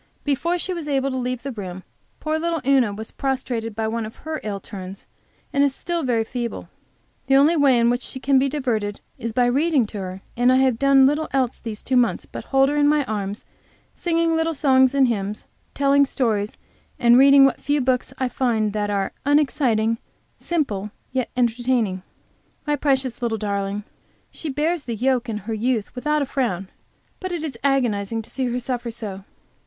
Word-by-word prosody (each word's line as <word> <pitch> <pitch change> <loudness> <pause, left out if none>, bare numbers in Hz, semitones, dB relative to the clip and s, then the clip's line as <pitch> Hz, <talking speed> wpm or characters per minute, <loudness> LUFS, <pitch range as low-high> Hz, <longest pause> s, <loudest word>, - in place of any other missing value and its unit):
Before 335 +5 0
she 370 +2 -1
was 335 -4 -5
able 275 -1 0
to 260 - -2
leave 250 -1 -3
the 275 - -4
room, 190 -5 -7 0.4
poor 310 0 -1
little 335 0 -1
Una 265 -5 +4
was 220 +2 -7
prostrated 250 -5 -2
by 220 0 -1
one 230 +1 -2
of 215 +1 -8
her 315 -1 -3
ill 205 -2 -3
turns, 190 -1 -9 0.5
and 280 - +3
is 280 -2 +1
still 345 -1 -2
very 240 -5 +1
feeble. 235 +1 -5 0.6
The 270 - +4
only 290 +5 +5
way 280 -5 +4
in 235 0 +4
which 245 +1 -1
she 260 - -5
can 270 0 +3
be 275 +1 +1
diverted 225 -8 -2 0.2
is 230 -1 -3
by 245 +2 +2
reading 275 +1 +2
to 210 0 -7
her, 185 0 -6
and 245 +1 +4
I - - +5
have 260 -3 +3
done 275 -1 +6
little 295 +3 +1
else 260 -3 0
these 220 -3 -6
two 255 - +1
months 245 -2 +2
but - - -8
hold 270 0 +3
her 290 - -1
in 290 0 +4
my 295 -1 +3
arms, 205 -2 -4 0.5
singing 335 -1 +1
little 325 0 0
songs 265 -2 +4
and 270 -2 +5
hymns, 210 -2 -3 0.3
telling 280 0 +4
stories 215 -6 -1 0.4
and 240 0 +5
reading 275 +1 +8
what 270 - +1
few 290 +1 +1
books 255 -1 0
I 260 - 0
can 245 - -12
find 220 -5 +1
that 210 -1 -1
are 200 -1 -1
unexciting, 255 -6 +2 0.4
simple, 215 - -2 0.2
yet 255 -1 -1
entertaining. 235 -5 +1 0.6
My 295 -1 +1
precious 265 -4 0
little 230 -2 0
darling! 200 0 -2 0.5
She 320 - -6
bears 305 +3 -1
the 235 - -3
yoke 250 +1 0
in 215 - -2
her 225 - -3
youth 225 -1 -1
without 300 +3 0
a - - -2
frown, 215 -9 -2 0.5
but 370 -1 -4
it 340 -3 -3
is 295 -6 -4
agonizing 230 -6 +1
to - - -17
see 265 - -2
her 245 +1 -1
suffer 245 -1 -3
so. 210 -4 -7
255 Hz, 195 wpm, -22 LUFS, 220-280 Hz, 0.6 s, reading